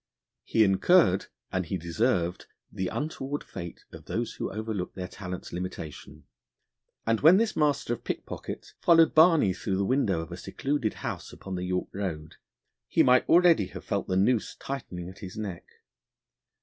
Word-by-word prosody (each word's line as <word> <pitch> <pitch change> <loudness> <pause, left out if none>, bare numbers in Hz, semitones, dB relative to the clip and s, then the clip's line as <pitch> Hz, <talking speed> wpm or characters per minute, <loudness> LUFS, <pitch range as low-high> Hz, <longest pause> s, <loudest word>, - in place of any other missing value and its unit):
He 110 - +3
incurred 95 - +4 0.2
and 95 -2 -1
he 95 - -2
deserved 90 +1 0 0.2
the 95 - -2
untoward 145 - -3
fate 85 -3 -8
of - - -12
those - - -2
who - - -4
overlook 110 -3 -4
their 90 -1 -4
talents' 90 -1 -7
limitation; 90 -4 -7 0.8
and 115 -1 +1
when 165 +5 +8
this 225 +1 +1
master 145 -5 +1
of 120 - -7
pickpockets - - -6
followed 165 -1 +5
Barney 160 - +6
through 95 +1 -2
the 100 - +1
window 105 -9 +1
of 80 +2 -9
a 85 - -6
secluded 135 0 -2
house - - -4
upon 95 - -8
the 90 0 -3
York 90 0 -2
Road, 80 -6 -5 0.5
he - - +4
might 125 0 +4
already 170 - +5
have - - -10
felt - - -2
the 95 - 0
noose 110 +4 +2
tightening 90 -10 -6
at 95 +2 -11
his 95 0 -8
neck. 100 -5 -5
100 Hz, 160 wpm, -28 LUFS, 90-135 Hz, 0.8 s, when